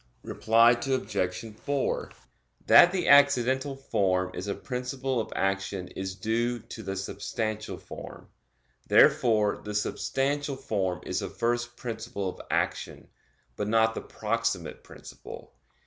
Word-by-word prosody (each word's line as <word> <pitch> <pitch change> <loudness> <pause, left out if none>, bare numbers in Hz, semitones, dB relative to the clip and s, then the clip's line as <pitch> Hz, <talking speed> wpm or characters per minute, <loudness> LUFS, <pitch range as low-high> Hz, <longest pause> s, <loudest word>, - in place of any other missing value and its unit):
Reply 115 +1 +4
Obj. 120 -5 -1 0.2
4: 140 -1 -1 0.5
That 175 - +8
the 180 -2 -1
accidental 140 -1 +4
form 95 -8 0
is 95 +2 -5
a 100 - -2
principle 125 0 -3
of 110 -1 -4
action 95 -1 -1
is 95 0 -5
due 115 +3 -1
to 110 0 -10
the 95 -2 -4
substantial 105 +2 -4
form. - - -10 0.6
Therefore 110 -3 +4
the 105 0 -5
substantial 140 +6 -1
form 95 -8 -2
is - - -1
the - - -4
first 120 +1 -2
principle 110 -4 -4
of - - -9
action; - - -2 0.5
but 105 - -3
not 110 +1 +3
the - - -5
proximate 110 -5 -3
principle. - - -12
115 Hz, 125 wpm, -28 LUFS, 100-125 Hz, 0.6 s, That